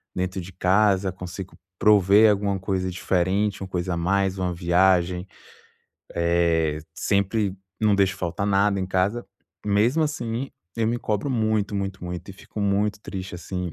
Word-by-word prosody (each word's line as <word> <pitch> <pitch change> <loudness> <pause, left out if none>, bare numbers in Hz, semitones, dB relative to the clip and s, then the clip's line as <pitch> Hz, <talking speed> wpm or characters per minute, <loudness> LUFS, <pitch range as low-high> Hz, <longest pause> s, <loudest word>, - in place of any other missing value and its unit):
dentro 95 +1 -2
de 90 +1 -8
casa, 95 0 +2
consigo 90 +1 -8 0.2
prover 105 +1 +6
alguma 100 -1 0
coisa 95 -1 -2
diferente, 95 +3 0
uma 95 - -4
coisa 90 -1 -2
a - - -4
mais, 95 +2 +1
uma 90 -1 -1
viagem, 90 +1 +2 0.9
eh, 85 -2 +1
sempre 100 +1 0 0.2
não 105 -2 +4
deixo 100 0 +2
faltar 90 +2 -3
nada 100 0 +2
em 95 - -2
casa. 95 +6 0 0.4
Mesmo 110 +10 +2
assim, 125 -4 -2 0.3
eu 115 -1 +1
me 120 +1 0
cobro 110 +6 -2
muito, 110 -3 0
muito, 95 -2 -4
muito, 90 +1 -6
e - - -8
fico 105 +2 -9
muito 100 +1 +1
triste, 95 -3 -6
assim, 90 -1 -5
95 Hz, 155 wpm, -24 LUFS, 90-105 Hz, 0.9 s, prover